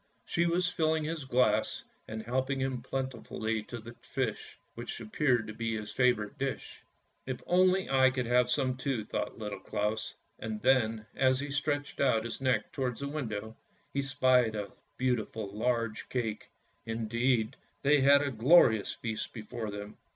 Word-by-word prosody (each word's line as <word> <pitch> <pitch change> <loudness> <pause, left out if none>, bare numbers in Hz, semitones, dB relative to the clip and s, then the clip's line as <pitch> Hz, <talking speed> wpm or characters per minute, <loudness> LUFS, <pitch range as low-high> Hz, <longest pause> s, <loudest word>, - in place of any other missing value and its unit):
She 170 0 +1
was 175 +1 +2
filling 160 -2 +1
his 155 -2 -3
glass 120 -4 +2 0.2
and 110 0 -5
helping 130 +3 -1
him 130 -2 -1
plentifully 115 -4 -3
to 120 0 -8
fish, 125 -6 -3 0.2
which 120 0 -6
appeared 120 +1 +1
to 110 - -7
be 115 0 -2
his 105 -1 -6
favourite 125 0 +1
dish. 135 0 -4 0.2
" - - -44
If 130 -2 -4
only 185 +1 +4
I 130 -1 +5
could 130 -1 -2
have 125 +1 +3
some 130 -1 +1
too," 125 -4 -2
thought - - -3
Little 105 -2 -5
Claus, 105 +1 -2 0.2
and 110 -1 -4
then 115 -4 +3
as 130 -1 +3
he 145 0 -4
stretched 145 0 -1
out 115 -5 +3
his 115 +2 -5
neck 130 -1 +1
towards 130 -1 -2
the 140 - -2
window 110 -7 -4 0.4
he 140 - +1
spied 130 -4 +3
a 105 -1 -4 0.3
beautiful, 110 -5 -1
large 115 -1 -1
cake 115 -4 -3 0.2
— - - -40
indeed, 115 +1 0 0.3
they 145 0 +5
had 140 +1 +6
a 140 - -1
glorious 115 -3 +5
feast 110 -2 -4
before 110 0 -5
them. 105 +1 -7
125 Hz, 165 wpm, -31 LUFS, 110-135 Hz, 0.4 s, had